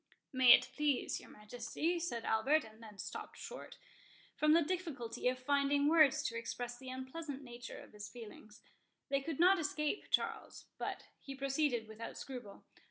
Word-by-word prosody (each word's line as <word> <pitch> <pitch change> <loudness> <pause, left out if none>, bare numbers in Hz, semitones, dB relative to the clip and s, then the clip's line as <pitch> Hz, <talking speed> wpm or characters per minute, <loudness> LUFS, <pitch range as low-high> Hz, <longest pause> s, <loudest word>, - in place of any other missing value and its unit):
"May 255 -2 +9
it - - +5
please 290 -3 +1
your - - -14
Majesty," 245 +10 -2
said 240 -9 -3
Albert—and 220 -1 +1
then 215 -3 -11
stopped - - -7
short, - - -8 0.6
from 305 0 +4
the 335 +1 +6
difficulty 290 -10 -3
of 255 0 +2
finding 280 +2 +2
words 310 -2 +6
to 230 - -2
express 240 +1 -4
the 260 -1 -8
unpleasant 265 +2 -6
nature 245 0 -8
of - - -14
his 205 -1 -7
feelings. 215 0 -11 0.5
They 275 0 +2
could 310 +1 -4
not 370 +2 +6
escape 300 +3 -1
Charles; - - -1
but - - -3 0.2
he 275 -1 -8
proceeded 275 -4 0
without 220 +1 -7
scruple. 245 -7 -8
265 Hz, 160 wpm, -36 LUFS, 235-300 Hz, 0.6 s, May